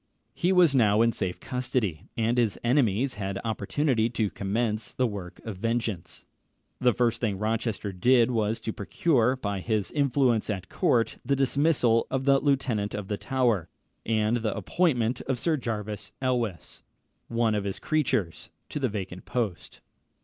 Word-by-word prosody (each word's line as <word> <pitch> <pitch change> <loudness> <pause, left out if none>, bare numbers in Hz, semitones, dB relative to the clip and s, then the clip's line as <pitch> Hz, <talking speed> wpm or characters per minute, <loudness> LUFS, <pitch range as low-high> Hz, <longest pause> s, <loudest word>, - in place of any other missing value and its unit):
He 180 +1 +1
was 180 -6 +5
now 110 -4 +4
in 115 - +3
safe 90 -4 -3
custody, 125 - -2
and 115 +2 +1
his 110 -6 +1
enemies 125 0 +2
had 95 0 -2
opportunity 115 +2 0
to 110 -3 -1
commence 105 +2 -2
the 130 - +2
work 95 -5 -5
of 110 -4 -5
vengeance. 115 -4 -3 0.5
The 125 -1 +4
first 120 0 0
thing 105 -5 0
Rochester 110 -1 -2
did 120 +5 +4
was 110 -1 0
to 110 - -3
procure, 125 - +1
by 100 -6 -3
his 105 0 -1
influence 130 -6 +2
at 95 -3 -3
court, 115 -2 +1
the 140 +3 +1
dismissal 135 -3 +2
of 130 0 -2
the 140 -1 +5
Lieutenant 130 -8 0
of 105 -2 -5
the 105 - -1
Tower, 120 - 0 0.3
and 110 +1 +1
the 110 -3 -2
appointment 120 - +1
of 130 -2 0
Sir 160 +5 +1
Jervis 105 -6 -4
Elwes, 120 -8 -2 0.5
one 115 -1 +1
of 105 -1 0
his 100 -1 -3
creatures, 110 - -1 0.2
to - - -4
the 130 -3 0
vacant 95 -3 -6
post. 110 -8 -3
115 Hz, 155 wpm, -27 LUFS, 105-130 Hz, 0.5 s, was